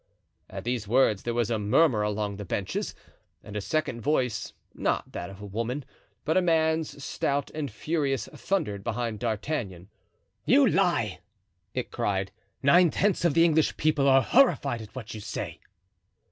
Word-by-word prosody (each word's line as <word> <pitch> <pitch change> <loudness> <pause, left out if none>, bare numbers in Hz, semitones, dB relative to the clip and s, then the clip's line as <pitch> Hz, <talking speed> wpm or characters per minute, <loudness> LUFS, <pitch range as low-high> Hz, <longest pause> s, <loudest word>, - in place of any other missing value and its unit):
At - - -7
these 120 -3 -2
words 110 -4 +3
there 120 - -2
was 120 -1 0
a 110 - +1
murmur 115 +3 +3
along 105 -1 -2
the 105 - -5
benches, 95 0 -3 0.5
and 105 - -10
a 105 - -1
second 125 -1 -1
voice, 130 -4 0 0.2
not - - -1
that 90 - -5
of 95 0 -11
a 105 - -8
woman, 115 +7 -3 0.4
but 160 - +1
a 185 - +5
man's, 160 -3 +1
stout 140 0 -1
and 150 -2 -4
furious, 140 +3 -1
thundered 140 - -2
behind 115 -1 -2
D'Artagnan. 105 - -3 0.5
"You - - +5
lie!" - - +1 0.6
it - - -3
cried. 95 -1 -1 0.3
"Nine 170 +5 +6
tenths 195 +2 +1
of 160 -4 +2
the 165 0 +6
English 160 -2 +2
people 150 -2 +2
are 135 0 +6
horrified 145 - +3
at 110 +2 -12
what 115 -4 -7
you 110 - -6
say." - - -5
125 Hz, 160 wpm, -27 LUFS, 105-155 Hz, 0.6 s, Nine